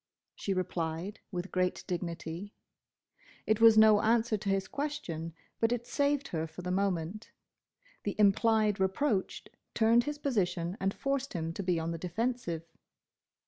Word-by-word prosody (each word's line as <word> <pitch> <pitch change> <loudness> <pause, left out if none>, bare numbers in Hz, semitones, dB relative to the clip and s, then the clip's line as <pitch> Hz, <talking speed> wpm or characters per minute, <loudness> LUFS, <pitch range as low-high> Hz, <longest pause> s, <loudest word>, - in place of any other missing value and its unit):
she 200 - -4
replied, 180 0 -2
with 180 0 -4
great 185 0 0
dignity. 170 +2 -5 0.9
It 215 +1 +1
was 225 -1 +8
no 215 -1 +7
answer 225 0 +2
to 200 -1 -3
his 195 0 +1
question, 225 - -4 0.2
but 225 0 +2
it 240 -1 -1
saved 285 +2 0
her 160 -1 -2
for 160 +3 -10
the 180 - -2
moment. 190 +1 -1 0.7
The 205 - -3
implied 210 0 +3
reproach 190 +2 0 0.3
turned 230 +1 +4
his 295 0 -3
position 190 -10 -1
and 195 0 +1
forced 275 +4 -2
him 165 -1 -3
to 195 - -4
be 180 -3 +1
on 165 +1 -2
the 165 - -4
defensive. 180 -2 -2
195 Hz, 145 wpm, -31 LUFS, 175-230 Hz, 0.9 s, was